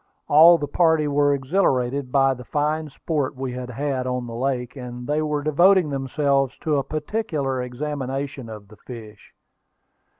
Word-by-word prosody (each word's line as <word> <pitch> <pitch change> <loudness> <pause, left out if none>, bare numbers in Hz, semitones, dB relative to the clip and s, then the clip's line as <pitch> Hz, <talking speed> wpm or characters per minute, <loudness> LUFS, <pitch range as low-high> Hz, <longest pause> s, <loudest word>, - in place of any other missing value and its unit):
All 165 +4 +8
the 150 - -3
party 160 0 +2
were 145 0 +2
exhilarated 135 -3 0
by 135 0 +3
the 125 -1 -10
fine 150 +3 -1
sport 145 -1 -3
we 130 -1 -4
had 125 0 -6
had 130 0 -2
on 125 -1 -2
the 115 - -8
lake, 125 0 -2
and 125 -2 -7
they 150 +3 0
were 150 -1 -1
devoting 175 +2 +4
themselves 135 0 0
to 150 -2 +1
a 140 - 0
particular 150 - -2
examination 135 -1 -4
of 105 -2 -10
the 105 - -15
fish. 110 -4 -12
140 Hz, 160 wpm, -23 LUFS, 125-150 Hz, -, All